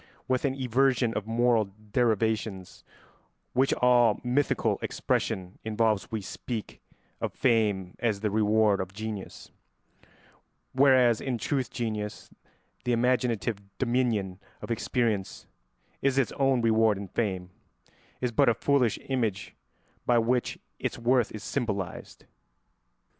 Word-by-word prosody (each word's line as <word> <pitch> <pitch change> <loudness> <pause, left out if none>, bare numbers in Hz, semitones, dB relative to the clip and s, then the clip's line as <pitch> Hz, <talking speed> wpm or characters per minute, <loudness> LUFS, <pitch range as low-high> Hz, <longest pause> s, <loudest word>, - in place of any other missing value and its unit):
With 130 +1 +1
an 135 -1 0
inversion 130 -2 +2
of 105 -1 -3
moral 115 -1 +3 0.3
derivations 110 -4 0 0.7
which 130 +2 +3
all 120 -3 +4
mythical 130 +3 +1
expression 90 0 -2
involves 110 -2 0
we 110 -2 -2
speak 110 +3 -6 0.4
of - - -2
fame 105 -7 +1
as 110 -4 0
the 105 -2 0
reward 105 -1 +3
of 95 0 -6
genius, 110 -1 -7 1.2
whereas 130 -4 +5
in 130 -3 -2
truth 130 0 -1
genius, 110 -3 -4 0.5
the 125 - +1
imaginative 120 -3 +1 0.2
dominion 120 -7 0 0.2
of - - -7
experience, 115 -3 -1 0.6
is 135 -1 +1
its 135 - +2
own 135 -3 +1
reward 110 -2 +3
and 100 -2 -8
fame 95 -6 -2 0.7
is 125 -1 0
but 115 - +4
a 115 - +2
foolish 130 -1 +2
image 115 -7 -2 0.5
by 120 - +4
which 120 +2 +1 0.2
its - - -3
worth 120 0 +2
is 110 - -8
symbolised. 105 -9 -4
115 Hz, 120 wpm, -28 LUFS, 105-125 Hz, 1.2 s, whereas